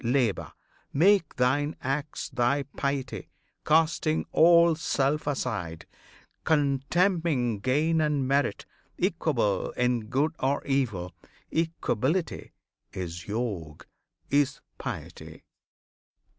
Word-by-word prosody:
Labour! 120 -3 0 0.4
Make 185 +3 +3
thine 145 +4 +1
acts 145 +3 -3
Thy 130 +2 +1
piety, 140 -1 -4 0.3
casting 160 0 +2
all 170 0 +6
self 150 -1 0
aside, 85 - -3 0.6
Contemning 145 - +1
gain 155 +8 +2
and 150 -3 +1
merit; 140 +1 0 0.3
equable 160 - 0
In 125 -3 +1
good 140 +7 +1
or 135 +2 0
evil: 110 -11 -1 0.4
equability 160 - -1 0.4
Is 90 -1 -6
Yog, 100 -9 -4 0.5
is 140 -1 +2 0.2
piety! - - -7
140 Hz, 90 wpm, -27 LUFS, 125-160 Hz, 0.6 s, all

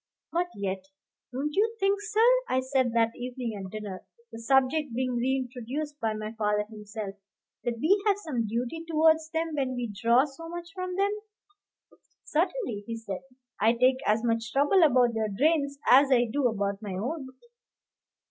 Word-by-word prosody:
But 350 +1 0
yet 190 -1 -3 0.5
"Don't 280 +4 -3
you 445 +3 +2
think, 395 +1 +2
sir," 430 +2 +2 0.2
I 255 - +2
said 260 -1 +1
that 230 -1 +3
evening 245 -2 -4
at 190 -2 -6
dinner, 210 -3 -6 0.3
the 225 - -8
subject 265 +2 +2
being 255 0 0
reintroduced 260 +3 -2
by 220 -1 -1
my 215 +1 -5
father 210 -1 +1
himself, 210 -1 -7 0.5
"that 240 -1 -2
we 390 - +3
have 405 -1 +4
some 270 - -2
duty 245 +9 -3
towards 320 0 +3
them 325 0 -2
when 265 -3 -1
we 240 -4 -4
draw 235 +6 +4
so 305 +3 -10
much 345 +1 -7
from 365 -1 -4
them?" 395 +2 +2 1.1
"Certainly," 325 - -1
he 230 -1 -4
said; 200 -4 -6 0.4
"I 220 +3 +4
take 255 +2 +3
as 215 +2 +2
much 230 -1 0
trouble 290 +9 +4
about 250 -6 +5
their 220 -1 -1
drains 280 +5 +1
as 270 +2 +7
I 245 -2 +5
do 280 -3 +2
about 200 -2 -2
my 205 -3 -5
own." 265 - -3
255 Hz, 165 wpm, -28 LUFS, 225-310 Hz, 1.1 s, as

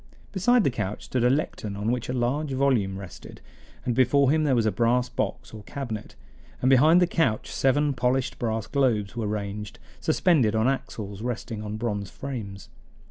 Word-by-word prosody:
Beside 235 +5 +3
the 140 - +2
couch 105 -3 -4
stood 125 -2 -1
a 125 - +5
lectern 125 -7 -1
on 105 +3 -1
which 125 -1 -2
a - - -1
large 135 +4 -1
volume 125 -8 +1
rested, 95 -2 -10 0.5
and 125 - +1
before 130 +2 +4
him 155 0 +2
there 135 -3 +3
was 115 -2 +2
a 110 - +2
brass 120 +4 +1
box 125 - -3
or 110 - -8
cabinet, 120 -7 -6 0.4
and 130 - +2
behind 155 +7 +6
the 180 - +5
couch 165 -10 0
seven 145 +2 +2
polished 125 +1 0
brass 110 -2 -1
globes 120 -7 0
were 115 -3 -2
ranged, 105 0 -4 0.2
suspended 155 - +2
on 110 +2 +2
axles 105 -6 -3
resting 115 -2 -4
on 105 0 -5
bronze 105 -4 -3
frames. 110 -8 -7
120 Hz, 180 wpm, -26 LUFS, 105-135 Hz, 0.5 s, behind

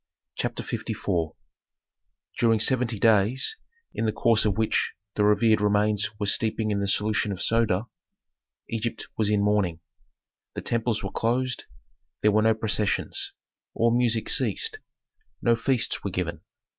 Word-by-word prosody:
CHAPTER - - -3
LIV - - -4 1.4
During 115 -1 +3
seventy 125 -1 +2
days, 110 - +3 0.4
in - - -2
the - - +2
course 115 0 +3
of 100 -3 0
which 110 -1 0 0.2
the 105 - 0
revered 105 +1 +3
remains 105 0 +1
were 105 - -1
steeping 110 +1 0
in 100 - 0
the 100 - -1
solution 105 +1 +1
of 95 - -5
soda, 115 -2 +2 0.8
Egypt 115 0 -4
was 110 -2 +1
in 105 -1 +2
mourning. 100 -5 +1 0.8
The - - -4
temples 115 -2 -1
were 95 - -4
closed; 125 +2 -1 0.6
there 105 - +5
were 110 +1 +3
no 110 0 +3
processions. 110 -1 -1 0.4
All 115 +1 +2
music 115 -2 +1
ceased; 450 -1 +2 0.6
no 120 -1 +3
feasts 120 +1 0
were 100 - -2
given. 85 -3 -4
110 Hz, 140 wpm, -25 LUFS, 105-115 Hz, 1.4 s, there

